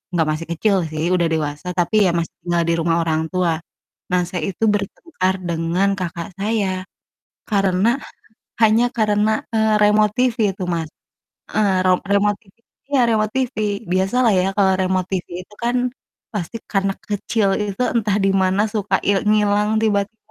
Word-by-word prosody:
gak 160 -2 +2
masih 155 +2 -4
kecil 200 +5 +1 0.2
sih 155 0 -3
udah 170 -2 +2
dewasa, 150 +1 -3
tapi 175 +5 0
ya - - +4
masih 170 -1 -2
tinggal 175 -1 +1
di - - +3
rumah 165 0 +1
orang 160 -1 0
tua. 175 -3 0 0.5
Nah, 180 0 +3
saya 180 -3 -3
itu 200 - -5
bertengkar 200 - -2
dengan 170 +4 +1
kakak 170 -2 -4
saya 195 -3 -1 0.6
karena 195 0 +2 0.7
hanya 220 +2 +5
karena, 210 0 +2 0.2
eee, 220 -1 +3
remote 210 0 +4
TV 250 -2 +2 0.2
itu 190 0 -5
Mas. 165 -2 -3 0.7
Eee, 195 -3 +2
ro 185 - +5 0.2
remot 205 0 +3
TV 195 -4 -25 0.4
iya 270 -3 +4
remot 215 -2 +1
TV. 260 -1 -1 0.4
Biasa 190 +5 +1
lah 230 - +5
ya 180 - +1
kalo 195 -2 +4
remote 185 -1 0
TV 185 -2 -2 0.2
itu 210 - -19
kan 240 +1 +1 0.6
pasti 205 0 -4 0.2
karena 195 -1 +1 0.2
kecil 205 0 0
itu 205 0 -4
entah 210 -4 +1
di 195 - +3
mana 190 +2 +2
suka 210 -2 +1
il 200 -1 +4
ngilang 210 0 +2
tiba-tiba 205 0 0
195 Hz, 165 wpm, -20 LUFS, 180-215 Hz, 0.7 s, hanya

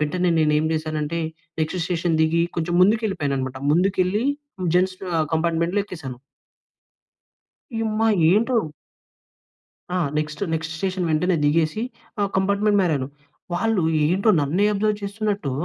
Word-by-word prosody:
వెంటనే 180 +4 +1
నేనేం 150 -1 +3
చేశాను 155 -1 -2
అంటే, 160 +3 -2 0.4
నెక్స్ట్ 155 +4 -1
స్టేషన్ 170 -2 0
దిగి 160 +1 +3
కొంచెం 175 +1 -1
ముందుకు 215 +5 +4
వెళ్ళిపోయానన్నమాట. 140 -8 -2 0.2
ముందుకెళ్ళి 190 +5 +1 0.5
జెంట్స్ 185 +1 +2 0.2
ఆహ్, 155 - +1
కంపార్ట్మెంట్‌లో 170 +4 +1
ఎక్కేసాను. 140 -10 -8 1.6
యుమ్మా! 220 0 0 0.2
ఏంటిరొ 230 +4 +2 1.3
ఆ! 185 - 0 0.2
నెక్స్ట్ 155 +1 -4
నెక్స్ట్ 160 0 -2
స్టేషన్ 185 +1 -2
వెంటనే 175 +3 +2
దిగేసి 155 +7 +1 0.4
ఆహ్, 200 - +1
కంపార్ట్మెంట్ 200 +2 +2
మారాను. 150 -7 0 0.5
వాళ్ళు 220 0 +1 0.2
ఏంటో 190 +8 +3
నన్నే 155 +8 +1
అబ్జర్వ్ 210 +1 0
చేస్తున్నట్టు 200 -5 -2
175 Hz, 120 wpm, -23 LUFS, 155-200 Hz, 1.6 s, ముందుకు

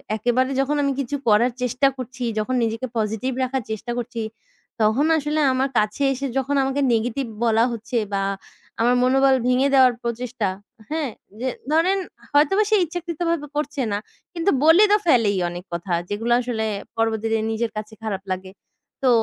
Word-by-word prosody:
একেবারে 245 +4 +1
যখন 280 +2 0
আমি 280 -1 +1
কিছু 275 +1 -2
করার 225 +4 +4
চেষ্টা 250 +2 +2
করছি, 255 0 -6 0.2
যখন 255 +5 -1
নিজেকে 230 +3 -2
পজিটিভ 220 +4 -1
রাখার 260 0 -1
চেষ্টা 220 +3 -4
করছি, 240 -1 -4 0.6
তখন 220 +7 +3
আসলে 300 +1 -1
আমার 265 +1 +1
কাছে 215 +6 +1
এসে 275 +1 -3
যখন 270 +2 0
আমাকে 270 +1 -1
নেগেটিভ 240 +3 -1 0.2
বলা 225 0 +4
হচ্ছে, 235 +2 -4 0.2
বা 195 - +1 0.6
আমার 245 +2 +4
মনোবল 270 +1 +4
ভেঙে 255 +2 +3
দেওয়ার 260 -2 +6
প্রচেষ্টা। 235 -1 -2 0.4
হ্যাঁ? 310 -3 -1 0.3
যে 255 - -2 0.2
ধরেন, 340 +5 +3 0.4
হয়তোবা 305 +9 +4
সে 435 - +4
ইচ্ছাকৃত 340 0 -6
ভাবে 320 -3 -1
করছে 295 -1 -2
না। - - +1 0.4
কিন্তু 345 +3 +1
বলে 325 +6 +7
তো 420 - +6
ফেলেই 230 -9 +4
অনেক 175 +1 -8
কথা। 175 +1 -3 0.2
যেগুলা 225 +4 +1
আসলে 235 -3 -2 0.3
পরবর্তীতে 225 0 +1
নিজের 225 0 -1
কাছে 215 +1 -6
খারাপ 195 -3 -3
লাগে। 185 0 -4 0.5
তো, 260 - +4
250 Hz, 160 wpm, -22 LUFS, 225-280 Hz, 0.6 s, বলে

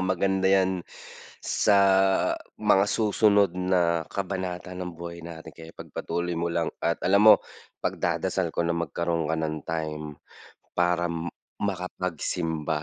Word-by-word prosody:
maganda 95 +1 +1
'yan 95 -2 +2 0.6
sa 100 -2 +2 0.8
mga 105 -2 +4
susunod 105 -3 +3
na 90 -2 +1
kabanata 95 -1 -4
ng 90 -1 -5
buhay 85 0 -7
natin 80 -1 -9
kaya 80 0 -11
pagpatuloy 85 +1 -4
mo 85 +1 -1
lang 85 -1 0
at 85 - +1
alam 100 +2 +5
mo - - +11 0.5
pagdadasal 85 +1 -1
ko 85 - -1
na 85 - +1
magkaroon 85 -1 -1
ka 80 - +1
ng 80 -1 -2
time 80 -2 -4 0.7
para 85 0 +2 0.5
makapagsimba. 85 -5 -2
85 Hz, 120 wpm, -26 LUFS, 85-95 Hz, 0.8 s, mo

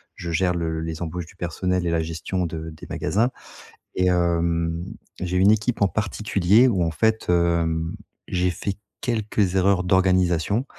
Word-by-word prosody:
je 85 - -5
gère 90 +2 +1
le 80 -2 -2
les 80 0 -5
embauches 85 +1 -4
du 85 - -17
personnel 90 +1 -2
et - - +1
la 85 -1 +1
gestion 85 +3 -3
de 80 -1 -5
des 80 -1 -11
magasins. 115 +6 0 0.6
Et 90 - +2
hem, 85 -1 +1 0.4
j'ai 90 0 -1
une 95 +3 +6
équipe 110 +2 0
en 100 - +5
particulier 105 +2 +2
où 95 -8 +1
en 80 - 0
fait, 110 +8 +1
hem, 85 0 +1 0.3
j'ai 90 -2 +1
fait 100 +3 -3 0.3
quelques 105 -5 0
erreurs 95 0 +3
d'organisation, 95 +4 +2
90 Hz, 160 wpm, -23 LUFS, 85-100 Hz, 0.6 s, une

